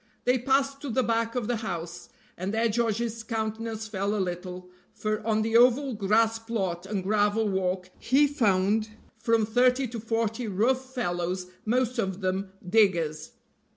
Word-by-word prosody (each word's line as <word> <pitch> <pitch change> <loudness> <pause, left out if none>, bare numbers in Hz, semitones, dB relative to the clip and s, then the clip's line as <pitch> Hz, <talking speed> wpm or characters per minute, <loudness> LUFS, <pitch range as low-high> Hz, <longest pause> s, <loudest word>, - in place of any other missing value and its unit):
They 250 +1 +3
passed 275 +2 +1
to 285 - -5
the 255 +2 +1
back 230 0 0
of 245 -3 -1
the 245 - 0
house, 175 -6 -5 0.3
and 185 +2 -3
there 225 +2 +2
George's 230 0 -1
countenance 220 0 -3
fell 200 0 -1
a - - -1
little, 180 -1 -4 0.2
for 215 0 -2
on 215 -1 +2
the 225 +1 -1
oval 250 +3 +5
grass 220 +2 +2
plot 195 -6 -3
and 195 -2 -2
gravel 210 +2 +2
walk 185 -1 -1
he 275 +4 +4
found 215 -6 +1 0.3
from 230 -1 +2
thirty 250 +4 +3
to 235 0 -5
forty 225 +1 -1
rough 255 +6 0
fellows, 180 -4 -2
most 245 +2 +1
of 190 -2 -2
them 190 +1 -1 0.2
diggers. 170 -7 +2
220 Hz, 155 wpm, -27 LUFS, 190-235 Hz, 0.3 s, oval